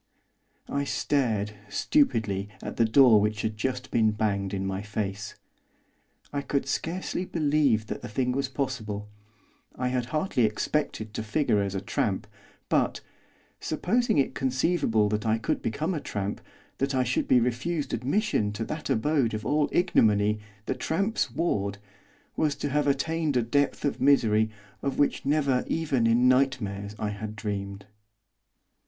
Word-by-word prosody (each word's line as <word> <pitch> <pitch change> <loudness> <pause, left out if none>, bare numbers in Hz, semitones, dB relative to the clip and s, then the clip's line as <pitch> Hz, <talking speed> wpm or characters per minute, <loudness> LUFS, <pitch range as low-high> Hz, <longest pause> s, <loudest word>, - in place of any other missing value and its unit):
I 140 0 -1
stared, 115 -8 0 0.2
stupidly, 105 - +1
at - - -6
the 115 - +4
door 115 -2 +6
which 105 0 -1
had 110 -1 -1
just 125 +3 -3
been 110 -2 +4
banged 100 -2 -1
in 95 -1 -2
my 95 0 -2
face. 105 -1 -4 1.0
I 145 - -1
could 140 0 -1
scarcely 180 +2 -2
believe 145 -10 +2
that - - -5
the - - -6
thing 125 +3 0
was 135 +1 -1
possible. 110 -7 -3 0.7
I 125 0 -1
had 125 -1 -1
hardly 155 -2 0
expected 110 0 -1
to 110 - -3
figure 110 -1 +1
as 100 0 -2
a 95 - -2
tramp; 100 - -1 0.4
but, - - +1 0.6
supposing 220 +7 0
it 140 - +2
conceivable 130 -4 +1
that 105 0 -1
I 110 +1 +3
could 110 - -1
become 155 - -1
a 155 - -3
tramp, 100 0 -3 0.4
that 135 0 0
I 130 - +3
should 125 +1 0
be 125 - +5
refused 130 +7 -1
admission 135 - 0
to 110 +2 -3
that 155 +5 -5
abode 120 -1 +1
of 110 0 -5
all 150 +3 +2
ignominy, 105 - +3 0.3
the - - 0
tramp's 195 0 -1
ward, 105 - -1 0.6
was 150 -2 +1
to 145 0 -3
have 145 +1 +1
attained 150 +1 +1
a 120 - +2
depth 140 +6 0
of 145 - -1
misery 110 -6 +4 0.3
of 140 - -2
which 145 -1 +1
never 140 -4 +2
even 140 -8 +1
in 120 +2 +4
nightmares 115 -6 +1
I 105 - -2
had 105 +1 -6
dreamed. 100 -2 -4
125 Hz, 155 wpm, -27 LUFS, 105-145 Hz, 1.0 s, door